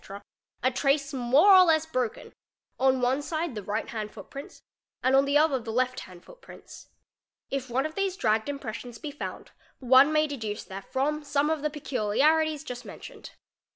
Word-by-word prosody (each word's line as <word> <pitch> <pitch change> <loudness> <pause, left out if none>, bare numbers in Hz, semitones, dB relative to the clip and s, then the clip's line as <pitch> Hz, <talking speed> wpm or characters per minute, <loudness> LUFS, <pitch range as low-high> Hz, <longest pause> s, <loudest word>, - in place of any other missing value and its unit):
a 255 - +3
trace 275 +2 0
more 270 +10 +5
or 375 -1 +9
less 320 -2 +3
broken, 255 -8 -3 0.5
on 260 -1 +3
one 255 +3 +1
side 315 0 -3
the 210 - -5
right 210 +3 -3
hand 215 -2 -4
footprints 250 +7 -11 0.4
and 260 +1 +3
on 275 +1 +5
the 285 +1 +3
other 300 -3 +3
the 225 -1 -6
left 255 +2 0
hand 180 -2 -12
footprints. - - -14 0.6
If 270 -2 -3
one 260 +4 0
of 310 - -4
these 390 0 -2
dragged 220 - +1
impressions 245 -3 -6
be 300 - -7
found, 290 - -7 0.3
one 260 +3 +5
may 310 0 +3
deduce 225 -8 -5
therefrom 265 +10 -3
some 290 +1 0
of 315 -2 -1
the 300 - 0
peculiarities 300 +3 +1
just 250 -3 -7
mentioned. - - -11
275 Hz, 170 wpm, -27 LUFS, 240-305 Hz, 0.6 s, or